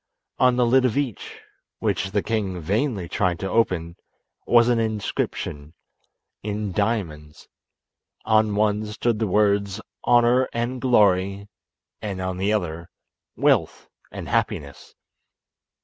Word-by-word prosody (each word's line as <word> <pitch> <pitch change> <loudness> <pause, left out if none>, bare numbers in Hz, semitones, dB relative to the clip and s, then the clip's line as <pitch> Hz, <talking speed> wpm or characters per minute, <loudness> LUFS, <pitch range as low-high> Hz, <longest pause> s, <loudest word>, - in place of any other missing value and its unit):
On 125 -1 +4
the 125 -1 +3
lid 130 +2 +4
of 125 -2 +1
each 135 -8 -4 0.4
(which 95 - -1
the 100 0 -1
king 100 -5 -2
vainly 100 - -1
tried 90 -1 0
to 95 - -4
open) 90 -7 0 0.5
was 120 0 +5
an 120 -1 +2
inscription 100 -8 -3 0.7
in 105 -1 -3
diamonds. 90 -8 -3 0.8
On 110 -1 +3
one 105 0 +1
stood 110 +1 -1
the 110 - 0
words 100 0 +1 0.3
"Honour 120 +2 +4
and 120 +2 -2
Glory," 100 -5 +2 0.5
and 100 -3 -4
on 95 0 -3
the 100 +3 0
other 85 -5 -2 0.5
"Wealth - - +1 0.2
and - - -7
Happiness." 70 -1 -3
105 Hz, 120 wpm, -23 LUFS, 95-115 Hz, 0.8 s, was